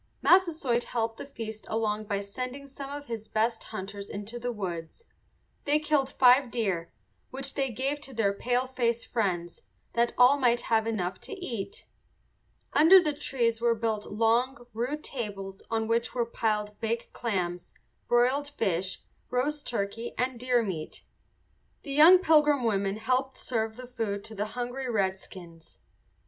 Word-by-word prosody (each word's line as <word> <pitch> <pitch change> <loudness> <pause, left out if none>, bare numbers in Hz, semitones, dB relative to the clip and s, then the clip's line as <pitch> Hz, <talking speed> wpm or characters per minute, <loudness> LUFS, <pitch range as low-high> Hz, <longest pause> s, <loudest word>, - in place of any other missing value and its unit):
Massasoit 320 -10 +3
helped 225 -1 -2
the - - -7
feast 220 -5 -7
along 215 -1 -1
by 200 -1 -1
sending 255 +7 -6
some 275 0 -8
of 285 0 -6
his 225 -4 -6
best 225 +1 0
hunters 200 -1 -7
into 210 +4 -6
the 245 +1 -2
woods. 180 - -5 0.6
They 290 +1 +4
killed 300 -3 +1
five 255 0 +5
deer, 195 -8 -1 0.4
which 270 +1 -5
they 270 -2 0
gave 270 +5 -2
to 270 - -6
their 205 -3 +2
paleface 245 0 0
friends, 175 -6 -2 0.3
that 235 0 +1
all 255 +3 +6
might 240 -2 +3
have 225 -1 +1
enough 190 -5 -2
to - - -7
eat. 365 - -5 0.9
Under 330 +6 +8
the 305 -4 0
trees 235 -5 -1
were 235 -1 +3
built 220 -2 -2
long, 240 +4 +1
rude 255 +7 -2
tables 195 -6 -5
on 225 -1 0
which 230 +2 0
were 240 -2 +1
piled 210 -2 -2
baked 230 +1 -3
clams, 180 -6 -2 0.4
broiled 255 +4 +3
fish, 190 -9 -2 0.3
roast 290 +4 -1
turkey, 225 +1 -3
and 250 -1 -1
deer 250 -1 +2
meat. 165 -7 -5 0.8
The 280 - -4
young 320 +6 +9
Pilgrim 300 -6 +4
women 200 -3 0
helped 255 +4 0
serve 220 -3 -2
the 255 +1 -8
food 225 -5 -3
to 220 - -9
the 210 0 -2
hungry 250 +2 -3
redskins. 190 -5 -4
235 Hz, 150 wpm, -28 LUFS, 210-265 Hz, 0.9 s, young